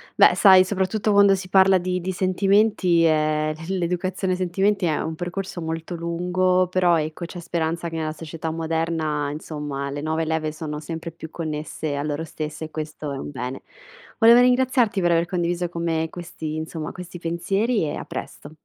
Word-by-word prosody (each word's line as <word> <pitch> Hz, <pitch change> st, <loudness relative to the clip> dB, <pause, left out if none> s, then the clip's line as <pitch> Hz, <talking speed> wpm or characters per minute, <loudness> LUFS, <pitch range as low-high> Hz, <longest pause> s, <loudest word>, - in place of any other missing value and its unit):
Beh, -, -, +6 dB
sai 190 Hz, -2 st, +7 dB
soprattutto 200 Hz, +3 st, 0 dB
quando 200 Hz, -1 st, +6 dB
si 185 Hz, -1 st, -7 dB
parla 190 Hz, 0 st, +6 dB
di 180 Hz, 0 st, -1 dB
di 185 Hz, +2 st, -3 dB
sentimenti, 190 Hz, -1 st, +3 dB
ehm, 155 Hz, -1 st, +2 dB
l 190 Hz, -, -1 dB
l'educazione 185 Hz, +2 st, -1 dB
ai 180 Hz, -, -3 dB
sentimenti 190 Hz, +2 st, +1 dB
è 155 Hz, -2 st, +1 dB
un 160 Hz, -, -3 dB
percorso 175 Hz, +2 st, -5 dB
molto 165 Hz, +2 st, -4 dB
lungo 180 Hz, +2 st, +1 dB
però 180 Hz, -2 st, +3 dB
ecco 155 Hz, +3 st, -4 dB
c'è 175 Hz, +1 st, -8 dB
speranza 170 Hz, 0 st, -2 dB
che 165 Hz, -, -7 dB
nella 155 Hz, -1 st, -2 dB
società 160 Hz, 0 st, -6 dB
moderna 160 Hz, -2 st, -1 dB
insomma 150 Hz, -2 st, -5 dB
le 145 Hz, +1 st, -4 dB
nuove 160 Hz, +1 st, -1 dB
leve 160 Hz, -1 st, -1 dB
sono 150 Hz, -1 st, -5 dB
sempre 165 Hz, +2 st, -6 dB
più 160 Hz, 0 st, -10 dB
connesse 155 Hz, -2 st, -4 dB
a 145 Hz, -, -2 dB
loro 150 Hz, +1 st, -2 dB
stesse 155 Hz, 0 st, -5 dB
e 155 Hz, -, -11 dB
questo 155 Hz, -1 st, -5 dB
è 135 Hz, -, -4 dB
un 145 Hz, -, -6 dB
bene. 130 Hz, -1 st, -5 dB, 0.5 s
Voleva 235 Hz, +1 st, +7 dB
ringraziarti 250 Hz, -4 st, +3 dB
per 175 Hz, -1 st, +2 dB
aver 170 Hz, 0 st, +3 dB
condiviso 175 Hz, -1 st, -1 dB
con 170 Hz, -1 st, -5 dB
me 160 Hz, -1 st, 0 dB
questi 160 Hz, -3 st, -6 dB
insomma 160 Hz, 0 st, -5 dB
questi 180 Hz, -1 st, -9 dB
pensieri 195 Hz, +6 st, 0 dB
e 145 Hz, -, -2 dB
a -, -, -6 dB
presto. 145 Hz, -, -7 dB
170 Hz, 185 wpm, -23 LUFS, 155-185 Hz, 0.5 s, sai